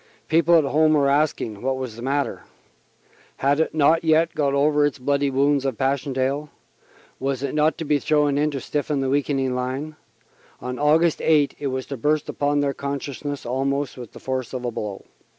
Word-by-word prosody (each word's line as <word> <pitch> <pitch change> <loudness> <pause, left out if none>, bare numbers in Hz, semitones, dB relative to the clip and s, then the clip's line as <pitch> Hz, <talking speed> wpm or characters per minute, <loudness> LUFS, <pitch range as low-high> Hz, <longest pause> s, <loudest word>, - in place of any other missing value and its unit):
People 170 +1 +4
at 160 - +4
home 155 +2 +3
were 140 -2 +3
asking 140 -8 0
what 130 +1 -1
was 130 -4 -5
the 115 - -9
matter. 140 +2 -1 1.0
Had 140 +2 +1
it 160 - 0
not 160 +2 +4
yet 160 +1 +3
got 140 -2 0
over 145 +1 +3
its 145 -2 0
bloody 140 +2 0
wounds 140 +1 +2
of 135 -5 -2
Passchendaele? 135 +1 -1 0.7
Was 135 0 -2
it 140 - -2
not 155 0 +2
to 165 - -4
be 145 0 +2
thrown 150 -1 +2
in 150 +1 +2
to 140 -2 -4
stiffen 145 +1 -2
the 135 -1 -1
weakening 135 -2 0
line? 130 +5 -3 0.6
On 125 0 -5
Aug. 155 +3 +3
8 150 -3 +3
it 145 - -2
was 130 -1 -3
to 140 - -6
burst 150 +5 0
again - - -6
upon 145 0 +1
their 140 -1 0
consciousness 140 0 -5
almost 135 +3 -1
with 120 -3 -10
the - - -11
force 130 -2 -4
of 125 -1 -4
a 120 - -1
blow. 105 -3 -6
140 Hz, 195 wpm, -23 LUFS, 130-150 Hz, 1.0 s, People